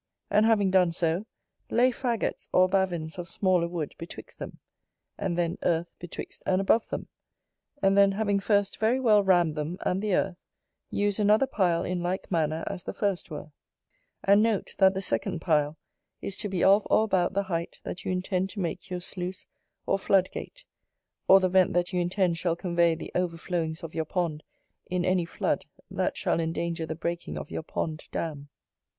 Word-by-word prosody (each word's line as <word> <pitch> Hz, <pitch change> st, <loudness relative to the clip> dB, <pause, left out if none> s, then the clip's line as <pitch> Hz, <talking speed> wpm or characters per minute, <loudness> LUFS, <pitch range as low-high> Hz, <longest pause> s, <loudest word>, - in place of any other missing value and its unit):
And 210 Hz, +2 st, +5 dB
having 205 Hz, -4 st, +3 dB
done 180 Hz, -2 st, +4 dB
so, 170 Hz, +4 st, -1 dB, 0.4 s
lay 245 Hz, +2 st, +4 dB
faggots 240 Hz, -2 st, -2 dB
or 185 Hz, 0 st, +5 dB
bavins 180 Hz, -4 st, -1 dB
of 175 Hz, -, -5 dB
smaller 180 Hz, -1 st, +2 dB
wood 170 Hz, -4 st, -4 dB
betwixt 165 Hz, -, -9 dB
them: -, -, -7 dB, 0.6 s
and 175 Hz, -2 st, -2 dB
then, 170 Hz, -1 st, -1 dB
earth 170 Hz, 0 st, 0 dB
betwixt 175 Hz, -, -7 dB
and 185 Hz, 0 st, +3 dB
above 205 Hz, +4 st, +2 dB
them: -, -, -4 dB, 0.8 s
and 195 Hz, 0 st, +4 dB
then, 200 Hz, 0 st, +5 dB
having 205 Hz, -1 st, +1 dB
first 200 Hz, -1 st, +1 dB
very 225 Hz, +4 st, +2 dB
well 215 Hz, -5 st, +5 dB
rammed 175 Hz, -4 st, +4 dB
them 155 Hz, +3 st, -3 dB
and 185 Hz, +2 st, 0 dB
the 210 Hz, -3 st, +1 dB
earth, 185 Hz, -2 st, 0 dB, 0.5 s
use 205 Hz, 0 st, 0 dB
another 210 Hz, +5 st, +4 dB
pile 175 Hz, -8 st, +1 dB
in 180 Hz, -1 st, -2 dB
like 180 Hz, +3 st, -3 dB
manner 160 Hz, -1 st, 0 dB
as 195 Hz, -2 st, -5 dB
the -, -, -6 dB
first 200 Hz, -4 st, -1 dB
were: 155 Hz, -1 st, -7 dB, 0.7 s
and 200 Hz, +1 st, +5 dB
note, 220 Hz, -3 st, 0 dB
that 190 Hz, -1 st, +6 dB
the 190 Hz, -, -1 dB
second 115 Hz, +4 st, -1 dB
pile 155 Hz, -2 st, +1 dB, 0.4 s
is 195 Hz, -, -4 dB
to 210 Hz, -, -3 dB
be 185 Hz, -3 st, -1 dB
of 200 Hz, +2 st, +5 dB
or -, -, +5 dB
about 190 Hz, -4 st, +1 dB
the 200 Hz, -, +2 dB
height 170 Hz, -3 st, -4 dB
that 180 Hz, -, -6 dB
you -, -, -2 dB
intend 185 Hz, +1 st, -1 dB
to 200 Hz, -, -7 dB
make 180 Hz, +1 st, -3 dB
your 180 Hz, -1 st, -3 dB
sluice 185 Hz, +1 st, -5 dB, 0.4 s
or 195 Hz, -, +1 dB
floodgate, 195 Hz, -, 0 dB, 0.6 s
or 195 Hz, -, +8 dB
the 185 Hz, -, +2 dB
vent 185 Hz, 0 st, +3 dB
that 175 Hz, +2 st, 0 dB
you 180 Hz, -, +1 dB
intend 175 Hz, -1 st, +1 dB
shall 170 Hz, -2 st, +1 dB
convey 170 Hz, -1 st, +2 dB
the 160 Hz, -, -8 dB
overflowings 170 Hz, -2 st, -2 dB
of 165 Hz, -, -7 dB
your 160 Hz, -, -1 dB
pond 160 Hz, -3 st, -2 dB, 0.4 s
in 180 Hz, -1 st, -1 dB
any 185 Hz, -2 st, +2 dB
flood -, -, -1 dB, 0.3 s
that -, -, -1 dB
shall -, -, +1 dB
endanger 165 Hz, 0 st, -2 dB
the 160 Hz, -, -3 dB
breaking 170 Hz, +2 st, -4 dB
of -, -, -7 dB
your -, -, -3 dB
pond 155 Hz, -1 st, -4 dB
dam. 145 Hz, -3 st, -4 dB
180 Hz, 185 wpm, -27 LUFS, 170-195 Hz, 0.8 s, or